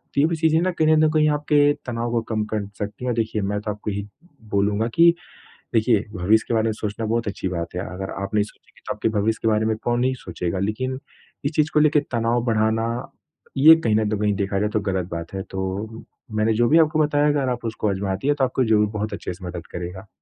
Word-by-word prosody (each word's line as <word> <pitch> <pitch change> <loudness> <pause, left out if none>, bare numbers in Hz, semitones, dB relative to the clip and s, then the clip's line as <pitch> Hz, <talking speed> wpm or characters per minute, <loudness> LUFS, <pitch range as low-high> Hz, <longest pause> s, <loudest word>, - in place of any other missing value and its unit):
तो - - +2
ये - - +5
भी 165 - -1
चीज़ें 160 0 +3
ना 185 - +1
कहीं 160 -3 +1
ना 155 0 +4
तो - - +1
कहीं 155 -1 +4
आपके 145 0 +3
तनाव 120 -1 -3
को 115 - +1
कम 110 -2 0
कर 105 -2 -2
सकती 105 +4 -5
हैं - - 0
औ - - 0
देखिए, 110 -1 -1
मैं 100 +1 -1
तो 105 - -3
आपको 105 +1 -5
यही 100 0 -4 0.4
बोलूँगा 100 +3 +1
कि 170 0 +7 0.6
देखिए 110 -2 +3
भविष्य 105 +4 +2
के - - -1
बारे 110 -1 +2
में 110 - +1
सोचना 105 +1 -4
बहुत 115 +1 -1
अच्छी 100 -2 -3
बात 85 -1 -4
है। - - -2
अगर 95 +1 -5
आप 100 - -6
नहीं 105 - +4
सोचेंगे 105 - -16
तो - - -1
आपके - - 0
भविष्य 110 +2 0
के 115 - 0
बारे 110 0 +2
में 110 0 +1
कौन 120 0 +1
नहीं 130 +1 +2
सोचेगा 90 +1 -3
लेकिन 130 +7 -2 0.5
इस 140 - +1
चीज़ 155 0 +2
को - - +4
लेके 150 0 +4
तनाव 115 0 +1
बढ़ाना, 110 0 +1 0.7
ये 155 +4 +9
कहीं 110 -2 +2
ना 110 0 +2
तो 105 - 0
कहीं 105 -1 +2
देखा 100 0 -1
जाए 105 +1 0
तो 110 - +2
गलत 95 -2 -2
बात 85 +1 -5
है। 95 - -3
तो 95 +2 -3 0.5
मैंने 110 +1 +2
जो 120 +2 +2
भी 160 - +5
आपको 155 0 +3
बताया 145 0 +2
अगर 140 -3 +1
आप 120 -1 -4
उसको 110 -1 -1
आज़माती 95 +4 -2
हैं 145 - +3
तो 140 - 0
आपको 130 0 +1
ज़रूर 105 -1 +3
बहुत 105 +1 -3
अच्छे - - -5
से 90 +1 -11
मदद 85 -1 -6
करेगा। 90 +3 -6
110 Hz, 250 wpm, -23 LUFS, 100-130 Hz, 0.7 s, ये